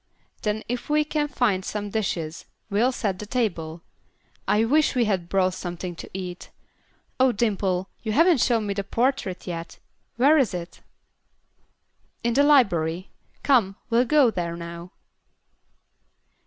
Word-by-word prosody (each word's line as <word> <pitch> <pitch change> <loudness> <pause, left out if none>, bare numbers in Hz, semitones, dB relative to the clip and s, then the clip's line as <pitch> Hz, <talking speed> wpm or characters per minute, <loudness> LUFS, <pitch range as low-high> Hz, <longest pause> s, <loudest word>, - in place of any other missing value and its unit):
Then 215 -1 -1
if 245 +3 -4
we 300 0 +3
can 300 0 -1
find 225 -9 0
some 205 +1 -4
dishes, 170 -7 -3 0.2
we'll 230 +6 +3
set 200 -7 -2
the 210 - -7
table. 170 -9 -2 0.6
I 220 +2 +3
wish 300 +4 +2
we 245 -2 +3
had 185 -5 -1
brought 185 -1 +2
something 175 -1 -5
to - - -9
eat. 180 -1 -7 0.7
Oh, 260 0 +5
Dimple, 195 -5 0
you 220 - -3
haven't 325 +1 +4
shown 230 -4 +2
me 200 - -1
the 200 0 -3
portrait 235 -2 -1
yet; 170 -2 -6 0.4
where 285 +6 +5
is 240 -9 +1
it?" 175 0 -7 1.4
"In 235 0 +1
the 275 - +4
library. 185 - +3 0.3
Come, 230 -9 +3 0.2
we'll 235 +2 +4
go 280 -3 +4
there 170 -3 -3
now." 170 +1 -8
210 Hz, 140 wpm, -24 LUFS, 180-250 Hz, 1.4 s, Oh